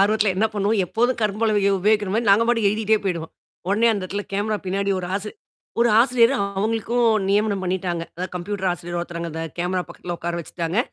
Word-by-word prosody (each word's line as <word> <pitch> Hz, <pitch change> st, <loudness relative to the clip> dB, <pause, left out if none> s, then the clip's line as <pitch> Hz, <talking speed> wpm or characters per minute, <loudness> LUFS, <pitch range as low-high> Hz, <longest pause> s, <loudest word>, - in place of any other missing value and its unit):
ஆர்வத்துல 210 Hz, 0 st, +3 dB
என்ன 220 Hz, +3 st, +3 dB
பண்ணுவோம்? 205 Hz, +1 st, +1 dB
எப்போதும் 240 Hz, +7 st, 0 dB
கரும்பலகையை 210 Hz, -1 st, +2 dB
உபயோகிக்கிற 210 Hz, 0 st, +2 dB
மாதிரி 225 Hz, -2 st, +1 dB
நாங்க 200 Hz, +3 st, +6 dB
பாட்டுக்கு 230 Hz, -4 st, +3 dB
எழுதிட்டே 215 Hz, +1 st, +2 dB
போயிடுவோம். 170 Hz, -4 st, -3 dB, 0.4 s
உடனே 215 Hz, +4 st, +3 dB
அந்த 205 Hz, -3 st, -3 dB
இடத்துல 200 Hz, +2 st, -3 dB
கேமரா 210 Hz, +2 st, 0 dB
பின்னாடி 200 Hz, +2 st, -1 dB
ஒரு 180 Hz, -, -5 dB
ஆசி 205 Hz, +1 st, -3 dB, 0.5 s
ஒரு 235 Hz, -, +5 dB
ஆசிரியர் 240 Hz, 0 st, +4 dB, 0.3 s
அவங்களுக்கும் 230 Hz, +3 st, +1 dB, 0.2 s
நியமனம் 205 Hz, 0 st, +2 dB
பண்ணிட்டாங்க. 180 Hz, -2 st, -2 dB
அதாவது 185 Hz, +2 st, -5 dB
கம்ப்யூட்டர் 190 Hz, +1 st, -2 dB
ஆசிரியர் 175 Hz, 0 st, -4 dB
ஒருத்தர் 170 Hz, -1 st, -6 dB
அந்த 160 Hz, +1 st, -5 dB, 0.2 s
கேமரா 180 Hz, +1 st, 0 dB
பக்கத்துல 175 Hz, -1 st, -6 dB
உட்கார 170 Hz, 0 st, -3 dB
வச்சுட்டாங்க. 170 Hz, +4 st, -3 dB
200 Hz, 175 wpm, -22 LUFS, 180-220 Hz, 0.5 s, நாங்க